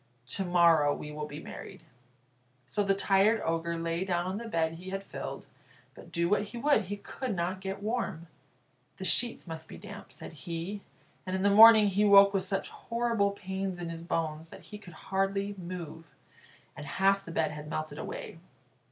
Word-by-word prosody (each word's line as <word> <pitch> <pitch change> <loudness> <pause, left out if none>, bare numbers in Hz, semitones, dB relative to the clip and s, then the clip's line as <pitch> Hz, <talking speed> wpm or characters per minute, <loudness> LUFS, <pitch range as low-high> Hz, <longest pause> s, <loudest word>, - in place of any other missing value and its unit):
To 195 - +2
morrow 170 -5 +4
we 150 - -7
will 150 0 -5
be 145 0 -8
married." - - -10 0.8
So 205 - -1
the 195 0 +2
tired 200 +3 +3
Ogre 165 +1 -1
lay 165 +1 -2
down 175 -2 -1
on 185 +2 -3
the 235 - -7
bed 165 -6 0
he 180 +3 -9
had 195 +1 -4
filled, - - -7 0.5
but, - - -14
do 170 0 +1
what 200 +2 +2
he 225 +4 -9
would, 235 -4 +3
he 205 +2 -4
could 230 +2 -5
not 180 +2 -2
get 195 +1 -5
warm. 210 -7 -2 0.7
"The - - -6
sheets 240 -1 +1
must 160 -2 -7
be - - -10
damp," 200 +1 -10
said - - -9
he, 170 +7 -5 0.4
and 185 0 -3
in 190 - -1
the 200 - +4
morning 220 +1 +9
he 200 +2 +1
woke 200 -1 +7
with 190 -1 0
such 195 0 -2
horrible 230 -3 0
pains 190 -1 -4
in 170 -1 -4
his 165 0 -7
bones 160 -1 -3
that - - -12
he 210 - -10
could 180 -5 -13 0.2
hardly 195 +1 0
move, 170 -3 -7 0.7
and 145 - -8
half 195 +4 +2
the 170 - -11
bed 160 -2 0
had 150 0 -8
melted 155 0 -4
away. - - -7
190 Hz, 190 wpm, -30 LUFS, 165-200 Hz, 0.8 s, morning